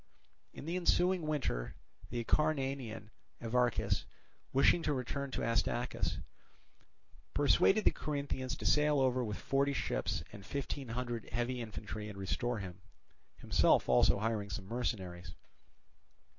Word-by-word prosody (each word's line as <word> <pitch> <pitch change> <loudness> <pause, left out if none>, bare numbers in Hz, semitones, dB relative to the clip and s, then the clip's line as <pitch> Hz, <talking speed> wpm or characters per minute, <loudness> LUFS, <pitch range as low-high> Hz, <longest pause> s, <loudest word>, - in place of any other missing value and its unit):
In - - -9
the 170 +3 -1
ensuing 180 -1 +2
winter 125 - -1 0.3
the 120 - -3
Acarnanian 135 -8 0 0.3
Evarchus, 115 -4 +1 0.5
wishing 135 +6 +5
to 150 -2 0
return 140 +2 -3
to - - -3
Astacus, 115 +1 0 1.2
persuaded 180 +8 +4
the - - +7
Corinthians 140 -3 -3
to - - -7
sail 150 -1 +4
over 130 -1 +2
with 105 -3 -3
forty 140 +1 +1
ships - - -1
and 100 - -9
fifteen 140 +3 -4
hundred 120 -1 -4
heavy 120 +2 -1
infantry 105 -1 -6
and 100 - -9
restore 115 +5 -1
him; 95 -2 -7 0.6
himself - - +3
also 65 +8 +5
hiring 105 -1 -1
some 95 - -5
mercenaries. 95 -7 -3
120 Hz, 125 wpm, -34 LUFS, 105-140 Hz, 1.2 s, the